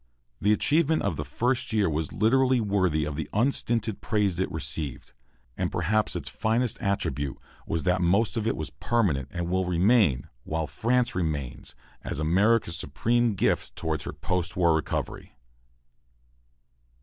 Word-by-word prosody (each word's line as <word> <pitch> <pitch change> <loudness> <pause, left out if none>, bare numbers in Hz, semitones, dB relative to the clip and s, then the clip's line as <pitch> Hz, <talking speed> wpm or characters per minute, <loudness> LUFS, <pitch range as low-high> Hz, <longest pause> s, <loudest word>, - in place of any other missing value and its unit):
The 105 - +3
achievement 155 +7 +2
of 100 -5 0
the 75 - -3
first 120 - -1
year 105 -3 +2
was 80 -1 -2
literally 130 +4 +3
worthy 95 -8 +1
of 75 -1 -4
the 75 -1 -4
unstinted 115 -2 +1
praise 100 -5 0
it 95 - -1
received. 75 -5 -5 0.4
And - - -2
perhaps 105 +5 0
its - - -4
finest 115 +1 0
attribute 70 -8 -1 0.3
was 80 -2 -1
that 90 +2 +2
most 100 +7 +2
of 110 -1 -1
it - - 0
was 75 -3 -4
permanent, 75 - 0
and 85 +1 -4
will 95 +1 0
remain, 90 - +3 0.2
while 80 0 -2
France 120 - 0
remains, 75 -8 -3 0.3
as - - -4
America's 95 +3 +2
supreme 120 +3 +1
gift - - 0
toward - - -2
her - - -5
post 90 -1 -2
war 85 -2 +4
recovery. 80 -1 -3
95 Hz, 150 wpm, -27 LUFS, 80-115 Hz, 0.4 s, war